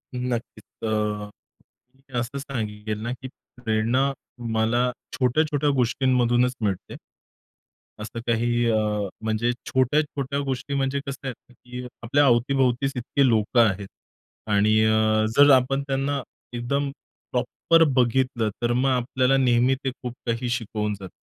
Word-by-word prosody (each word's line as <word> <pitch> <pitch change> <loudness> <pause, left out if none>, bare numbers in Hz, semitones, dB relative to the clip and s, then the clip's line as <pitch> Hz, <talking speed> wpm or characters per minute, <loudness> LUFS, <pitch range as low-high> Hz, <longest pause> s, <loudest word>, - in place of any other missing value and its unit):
नक्कीच 125 -2 -4 0.3
अ, 105 -1 -1 0.7
मी 135 0 -27
असं 125 +4 -3
सांगेल 110 -5 -4
ना 120 +1 -2
की 130 +1 -7 0.3
प्रेरणा 120 +5 +1 0.4
मला 120 +3 +2 0.2
छोट्या-छोट्या 145 +3 +1
गोष्टींमधूनच 125 0 +2
मिळते. 100 -4 -3 1.1
असं 110 +2 -6
काही 120 +1 +1
अ, 110 - +2 0.4
म्हणजे 110 +2 0 0.2
छोट्या-छोट्या 140 +1 0
गोष्टी 130 +2 -3
म्हणजे 135 0 0
कसं 140 0 -6
आहे 130 - -2
ना, 125 - -24
की 125 +1 -9 0.2
आपल्या 140 +5 +3
अवती-भोवतीच 130 +1 +2
इतके 130 +3 +1
लोकं 115 +1 +2
आहेत 100 0 -5 0.6
आणि 105 +2 +4
अ, 110 0 +3
जर 145 0 +8
आपण 135 +2 +1
त्यांना 135 +1 -1 0.3
एकदम 140 +4 -1 0.4
प्रॉपर 165 0 +2
बघितलं 125 -2 +2
तर 120 0 +1
मग 130 +2 +2
आपल्याला 130 +1 +2
नेहमी 125 0 +3
ते 135 - -1
खूप 125 -1 -4
काही 115 +1 -1
शिकवून 105 -3 -2
जातं. 95 -2 -8
125 Hz, 125 wpm, -24 LUFS, 115-135 Hz, 1.1 s, जर